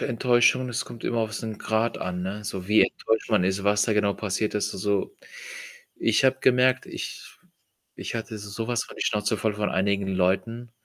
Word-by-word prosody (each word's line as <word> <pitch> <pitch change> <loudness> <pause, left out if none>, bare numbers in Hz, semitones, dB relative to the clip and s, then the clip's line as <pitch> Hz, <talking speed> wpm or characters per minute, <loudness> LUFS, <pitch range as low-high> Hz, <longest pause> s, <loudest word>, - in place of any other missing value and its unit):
Enttäuschung, 125 +1 +3
es 125 +1 -2
kommt 115 - -11
immer 120 - 0
auf 110 -1 -2
so 115 - -4
'n 110 -2 -5
Grad 110 +1 0
an, 90 -1 -3
ne? 100 +3 -5
So 95 -1 -5
wie 105 +1 +6
enttäuscht 110 +1 -1
man 105 -4 +4
ist, 95 +1 -1
was 100 0 +3
da 110 - +1
genau 105 -1 +2
passiert 105 +1 -2
ist. 105 - -1
Also, 100 - -1 0.8
ich 135 - +2
habe 130 0 +3
gemerkt, 130 0 +3
ich - - -6 0.7
ich - - -5
hatte 115 -1 -5
so 105 +2 -6
was 120 -1 0
von - - -13
die - - 0
Schnauze 105 0 0
voll 110 0 0
von 105 0 -1
einigen 100 +1 0
Leuten. 95 +6 0
110 Hz, 200 wpm, -25 LUFS, 100-115 Hz, 0.8 s, wie